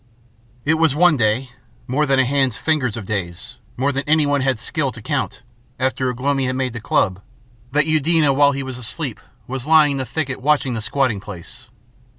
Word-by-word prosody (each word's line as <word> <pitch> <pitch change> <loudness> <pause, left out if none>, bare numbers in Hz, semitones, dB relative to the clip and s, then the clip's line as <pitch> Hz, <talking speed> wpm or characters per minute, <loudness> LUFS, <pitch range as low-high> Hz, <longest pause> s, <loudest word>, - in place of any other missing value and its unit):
It 160 +2 +2
was 160 -4 +3
one 175 0 +5
day 120 +2 0 0.3
more 150 +4 0
than 135 0 +3
a 130 - +4
hand's 130 -3 +1
fingers 135 -8 0
of 110 - -6
days, 95 +4 -5 0.2
more 135 +3 +1
than 135 0 -2
anyone 145 -2 +3
had 130 -2 +1
skill - - -2
to - - -10
count - - -3 0.4
after 130 0 0
Ugh 125 -1 -5
lomi 135 0 +1
had 130 - -1
made 130 -2 -2
the 115 - -6
club, 95 -3 +1 0.5
that 150 +2 +2
Eudena 155 -1 +3
while 140 +1 +5
he 135 0 -3
was 130 -1 -6
asleep 125 +2 -2 0.3
was 130 +2 -5
lying 155 -2 +6
in 140 - -2
the 130 - -2
thicket 130 +1 -3
watching 140 -2 +2
the 115 - -3
squatting 130 -2 0
place. 105 +6 -10
130 Hz, 195 wpm, -20 LUFS, 120-145 Hz, 0.5 s, lying